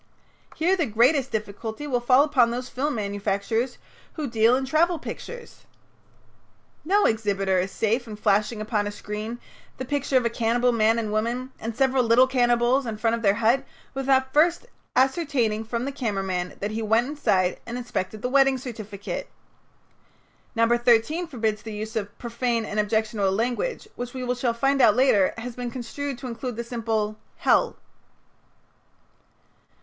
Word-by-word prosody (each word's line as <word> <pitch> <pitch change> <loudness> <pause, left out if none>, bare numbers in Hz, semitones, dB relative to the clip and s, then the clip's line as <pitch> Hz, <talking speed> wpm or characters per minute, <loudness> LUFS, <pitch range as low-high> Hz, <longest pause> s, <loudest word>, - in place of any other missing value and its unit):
Here 350 +4 +2
the 335 -5 0
greatest 255 +5 +3
difficulty 220 +4 -4
will 255 -4 0
fall 255 +3 +5
upon 265 -6 +3
those 245 +2 -4
film 285 +2 -2
manufacturers 205 +3 -1 0.4
who 310 - -4
deal 230 0 +4
in 265 +1 -1
travel 330 +5 +2
pictures. 480 +8 -9 1.2
No 405 +5 +3
exhibitor 195 -4 +1
is 185 +2 -1
safe 230 +3 0
in 215 - -6
flashing 210 +1 +1
upon 210 -1 -1
a - - -3
screen 210 +3 -6 0.4
the 260 - -4
picture 285 0 +1
of 250 - +1
a - - +3
cannibal 240 +2 +2
man 225 0 +3
and 220 -2 -2
woman 240 +4 -1
and 225 0 -5
several 265 -1 +3
little 235 +2 +5
cannibals 245 0 +2
in 220 -2 -4
front 225 +1 +1
of 230 - -6
their 200 -2 +3
hut 230 +4 +2 0.3
without 265 -1 +1
first 335 +8 +3 0.3
ascertaining 260 -6 +1
from 235 +2 -3
the 280 - -2
camera 220 -8 -2
man 180 -1 -3
that 205 +2 -2
he 220 +1 -3
went 225 +2 +2
inside 195 -11 +1
and 240 +1 -4
inspected 215 -4 -4
the - - +1
wedding 270 0 +4
certificate. 215 -6 -6 1.3
No. 230 0 +3
13 240 +8 +2
forbids 220 -7 -2
the 220 -1 -7
use 215 +2 -6
of 205 -2 -4
"profane 235 -1 -1
and 215 - -3
objectionable 215 -2 +1
language," 245 - -2
which 245 +1 -6
we 250 -1 -1
shall 245 -1 -1
find 275 +3 +1
later 225 -4 +4
has 235 +1 -6
been 245 -1 -4
construed 260 +3 -5
to 255 - -7
include 240 0 -5
the 235 - -4
simple 225 -3 -2 0.2
"Hell." - - +2
235 Hz, 160 wpm, -25 LUFS, 215-260 Hz, 1.3 s, fall